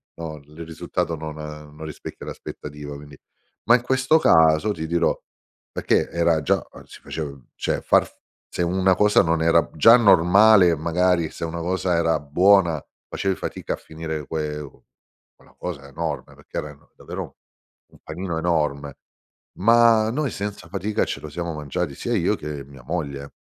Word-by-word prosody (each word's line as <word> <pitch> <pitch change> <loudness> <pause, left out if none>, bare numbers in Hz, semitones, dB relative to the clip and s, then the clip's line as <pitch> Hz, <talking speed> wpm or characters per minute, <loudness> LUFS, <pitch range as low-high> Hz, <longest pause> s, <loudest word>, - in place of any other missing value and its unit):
no, 80 -2 -6
il 75 +3 -11
risultato 80 0 -3
non 80 0 -6
non 75 0 -9
rispecchia 75 -1 -8
l'aspettativa, 75 -1 -8
quindi 70 -1 -12 0.5
ma 120 - +6
in 125 - +1
questo 130 +5 +3
caso 80 - +4
ti 80 -4 -4
dirò 85 0 +2 0.6
perché - - +1
era 85 -2 +1
già - - 0 0.2
si - - -14
facev 70 -5 -7
cioè - - -2
far - - +3 0.4
se - - -4
una 95 +1 +2
cosa 105 0 +4
non 85 0 +1
era 85 0 +3
già 115 +10 +8
normale 100 -2 +6
magari, 85 +1 +1
se - - -8
una 85 +1 -3
cosa 90 +1 0
era 80 -1 +2
buona 85 +1 +3 0.3
facevi 95 -1 -1
fatica - - -4
a - - -2
finire 80 -1 -6
que 75 -2 -3 0.7
quella - - -23
cosa 70 -6 -6
enorme 75 -1 -5
perché - - -10
erano 75 -1 -10
davvero - - -7 0.5
un - - -21
panino 85 +1 -4
enorme, 75 -4 -1 0.6
ma 115 +1 +5
noi 140 +1 -1
senza 100 +1 -5
fatica 105 +2 -1
ce - - -5
lo 75 - -8
siamo 85 +2 -4
mangiati, 75 +1 -3
sia 120 +11 -3
io 95 +2 +2
che 75 -2 -6
mia 70 -2 -15
moglie, 70 -3 -4
80 Hz, 155 wpm, -23 LUFS, 75-95 Hz, 0.7 s, già